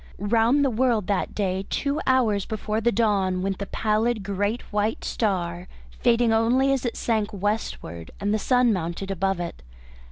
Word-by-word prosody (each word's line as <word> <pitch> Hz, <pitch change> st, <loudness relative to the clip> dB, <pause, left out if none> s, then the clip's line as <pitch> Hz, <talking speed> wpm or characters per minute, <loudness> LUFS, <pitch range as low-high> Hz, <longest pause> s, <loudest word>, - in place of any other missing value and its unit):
Round 230 Hz, +7 st, +3 dB
the 270 Hz, -, +1 dB
world 230 Hz, -3 st, +1 dB
that 200 Hz, -1 st, -1 dB
day, 190 Hz, -1 st, -1 dB
two 285 Hz, +1 st, -1 dB
hours 230 Hz, -7 st, +2 dB
before 215 Hz, 0 st, -2 dB
the 235 Hz, +1 st, +2 dB
dawn, 195 Hz, -5 st, +1 dB
went 195 Hz, 0 st, -2 dB
the 200 Hz, -, -4 dB
pallid 220 Hz, 0 st, 0 dB
great 205 Hz, +4 st, -1 dB
white 210 Hz, +1 st, 0 dB
star, 180 Hz, -5 st, -1 dB, 0.3 s
fading 230 Hz, -1 st, +3 dB
only 250 Hz, +5 st, +3 dB
as 265 Hz, -2 st, -1 dB
it 230 Hz, -, -4 dB
sank 220 Hz, -3 st, 0 dB
westward 200 Hz, -, -3 dB
and 205 Hz, +1 st, 0 dB
the 215 Hz, -, +1 dB
sun 250 Hz, +1 st, +3 dB
mounted 180 Hz, +2 st, -3 dB
above 195 Hz, 0 st, 0 dB
it. 170 Hz, -, -5 dB
210 Hz, 165 wpm, -25 LUFS, 195-235 Hz, 0.3 s, Round